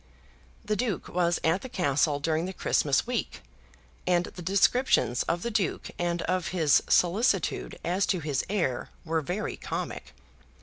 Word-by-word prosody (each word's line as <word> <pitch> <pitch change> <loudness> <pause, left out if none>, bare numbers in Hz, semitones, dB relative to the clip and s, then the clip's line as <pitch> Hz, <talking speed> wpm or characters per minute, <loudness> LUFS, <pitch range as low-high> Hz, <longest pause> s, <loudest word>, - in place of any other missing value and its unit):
The 215 0 0
Duke 210 -3 -2
was 175 -1 +1
at 165 +4 +2
the 260 - -7
Castle 145 - +1
during 160 +3 0
the 190 - -5
Christmas 140 -6 +1
week, 245 -1 -3 0.6
and 175 -1 +3
the 180 - -9
descriptions 195 - +3
of 170 +1 -1
the 235 - -2
Duke 205 -6 -1
and 175 -1 -1
of 185 0 -1
his 160 -6 +3
solicitude 195 +8 +2
as 185 +3 +1
to 185 - +1
his 145 -4 -1
heir 170 -12 -1 0.2
were 165 0 0
very 180 +8 -3
comic. - - -5
175 Hz, 155 wpm, -28 LUFS, 160-195 Hz, 0.6 s, and